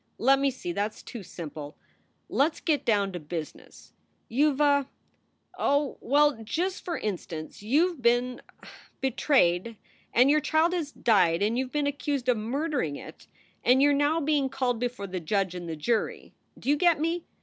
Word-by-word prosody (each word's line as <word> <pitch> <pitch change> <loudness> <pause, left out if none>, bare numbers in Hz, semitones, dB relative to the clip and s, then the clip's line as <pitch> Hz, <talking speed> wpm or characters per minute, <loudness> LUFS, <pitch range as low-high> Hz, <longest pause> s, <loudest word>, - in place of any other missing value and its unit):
Let 270 +3 +4
me 275 0 +2
see. 255 -9 -5
That 205 +4 -1
s - - -15
too 235 - -8
simple. 155 -5 -8 0.5
Let 295 +4 +2
s - - -13
get 295 -4 0
down 200 -3 +2
to 180 - -5
business. 155 -1 -8 0.4
"You 290 +6 +3
ve 295 - +1
a 285 -2 +3 0.7
Oh 285 0 +1
well, 290 -2 +3
just 350 - -2
for 345 -3 -3
instance, 170 -6 -5
you 300 - +2
ve 295 - -15
been 245 +1 +2 0.2
er - - -12 0.3
betrayed 230 - +1 0.3
and 250 +3 +5
your 305 +1 +3
child 320 +4 +2
has 325 -5 -2
died 185 -9 +2
and 215 +3 +1
you 260 +1 -1
ve - - -18
been 295 -1 0
accused 285 -2 -2
of 245 - +3
murdering 250 - -2
it - - -11 0.4
and 250 +2 +5
you 290 - +6
re 285 - +3
now 290 +3 +2
being 290 -3 +1
called 255 -3 -1
before 245 -4 -3
the 185 -1 -4
judge 190 +2 -1
and 175 -2 -6
the 160 - -3
jury. 220 +9 -2 0.2
Do - - -12
you 295 - +4
get 345 -1 +3
me? 330 +2 -1
255 Hz, 190 wpm, -27 LUFS, 200-290 Hz, 0.7 s, you